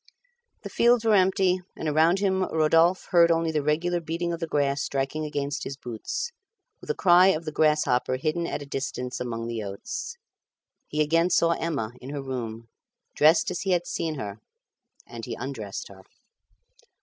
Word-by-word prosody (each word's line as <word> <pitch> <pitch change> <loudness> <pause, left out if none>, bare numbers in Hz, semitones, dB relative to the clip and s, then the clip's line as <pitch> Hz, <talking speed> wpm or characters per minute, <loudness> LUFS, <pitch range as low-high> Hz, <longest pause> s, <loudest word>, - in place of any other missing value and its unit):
The - - -6
fields 235 -1 +3
were 220 - +4
empty, 185 -1 +3 0.2
and 160 - -4
around 160 +4 +3
him 190 -1 +1
Rodolphe 165 +3 +3
only 170 -1 +4
heard - - -11
the 150 - +1
regular 165 +4 0
beating 170 +2 -3
of 170 - -4
the 165 - -3
grass 140 -2 0
striking 140 +3 -2
against 145 -1 -3
his 135 - -6
boots, 125 - -5 0.5
with - - -14
a 455 - 0
cry 180 0 +6
of 165 -4 +1
the 155 - -3
grasshopper 150 -5 +2
hidden 155 +5 -1
at 145 - -4
a - - -10
distance 130 -2 -4
among 115 -2 -4
the 115 -1 -4
oats. 470 - -6 0.7
He 150 0 +1
again 165 +3 +2
saw 170 -1 +3
Emma 150 -10 -2
in 130 - -8
her 140 -1 -5
room, 115 -4 -5 0.5
dressed 160 +4 +4
as 180 - -3
he 190 -1 +1
had 175 -1 0
seen 160 -2 -3
her, 105 -6 -6 0.7
and 115 -1 -9
he 120 - -5
undressed 115 -7 -6
her. 95 -1 -14
155 Hz, 175 wpm, -26 LUFS, 135-175 Hz, 0.7 s, cry